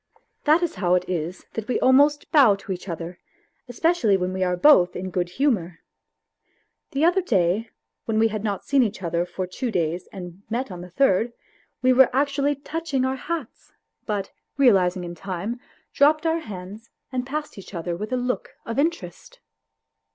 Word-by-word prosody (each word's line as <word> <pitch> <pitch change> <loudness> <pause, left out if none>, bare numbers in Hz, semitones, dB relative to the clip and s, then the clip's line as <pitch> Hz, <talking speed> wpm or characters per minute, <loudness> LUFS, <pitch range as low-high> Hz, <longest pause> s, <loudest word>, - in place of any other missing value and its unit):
That 315 +3 +4
is 345 - -1
how 180 -1 +3
it 180 0 0
is 175 0 -4
that 225 -1 -5
we 250 - 0
almost 285 +3 +4
bow 270 -10 +6
to 195 0 -8
each 185 +1 -5
other, 170 +1 -6 0.5
especially 245 - +2
when 180 0 -2
\ve 185 0 -1
are 180 -1 0
both 180 -7 +5
in 185 +1 -4
good 175 -1 -1
humour. 180 - -1 1.1
The 280 +4 +1
other 360 +3 +4
day, 205 - +1 0.4
when 220 -1 -1
we 225 +1 +4
had 215 -1 -4
not 205 -3 -2
seen 280 -2 +3
each 215 -5 -1
other 170 +1 -1
for 185 +1 -4
two 235 +8 -4
days 170 -3 -1
and 180 -1 -9
met 235 0 -2
on 175 -1 -7
the 180 - -9
third, 235 0 +2 0.5
we 255 0 +5
were 260 0 +6
actually 280 +1 +1
touching 285 -1 -2
our 260 0 0
hats, 305 -1 -6 0.3
but, 205 -3 -2 0.3
realizing 190 -9 +4
in 175 0 -6
time, 195 +7 -5 0.3
dropped 305 +3 +4
our 325 0 +2
hands 205 - -9 0.2
and 255 -1 -1
passed 300 -5 -4
each 195 - -11
other 170 0 -3
with 210 +7 -6
a 255 - +1
look 250 0 -3
of 230 +4 -3
interest. 340 +10 -3
220 Hz, 180 wpm, -24 LUFS, 180-275 Hz, 1.1 s, bow